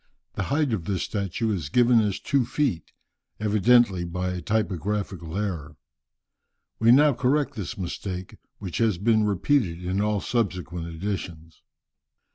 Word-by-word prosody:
the - - -3
height 145 -3 +1
of 90 -7 -2
this 95 -2 -1
statue 105 +2 -2
is 80 -7 -4
given 120 +3 +4
as 105 -3 -1
two 140 -2 +1
feet, 125 - -1 0.5
evidently 105 -2 +3
by 90 +1 -3
a 90 -1 -4
typographical 95 -3 -2
error. 90 -8 -4 1.0
We 115 +1 +5
now 145 +3 +6
correct 135 +4 +1
this 105 +2 -5
mistake, 90 0 -5 0.2
which 90 -4 -5
has 110 -6 +2
been 110 +2 +3
repeated 100 - +1
in 95 +3 0
all 105 0 +1
subsequent 90 -7 -2
editions. 85 -2 -6
100 Hz, 135 wpm, -25 LUFS, 90-115 Hz, 1.0 s, now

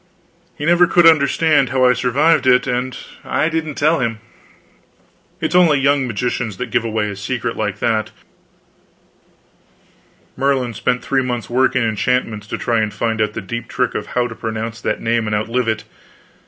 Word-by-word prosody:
He 150 - -4
never 175 +1 +5
could 175 0 +4
understand 155 -2 +4
how 130 +1 +2
I 125 - +5
survived 130 +4 +2
it, 125 0 +4
and 125 0 -2 0.3
I 155 - 0
didn't 160 -2 -3
tell 155 +3 +2
him. 115 -3 -1 1.2
It - - -1
is - - -2
only 170 -5 +5
young 140 -1 +2
magicians 120 -2 -3
that - - -5
give - - +1
away 110 -2 -1
a - - -7
secret 115 +3 -3
like 105 -2 -2
that. 110 -2 0 2.3
Merlin 135 -3 0
spent 125 +4 -1
three 135 -1 +1
months 125 -2 -4
working 130 0 +2
enchantments 110 -1 -1
to - - -4
try 115 -2 0
to 110 -1 0
find 110 0 -2
out 105 0 0
the - - -5
deep 120 +5 -6
trick 125 -2 -1
of - - -4
how 125 - +3
to - - -8
pronounce 115 0 -5
that 110 - -2
name 115 -1 0
and 105 - 0
outlive 115 +3 -1
it. 110 -1 -1
125 Hz, 175 wpm, -18 LUFS, 110-135 Hz, 2.3 s, never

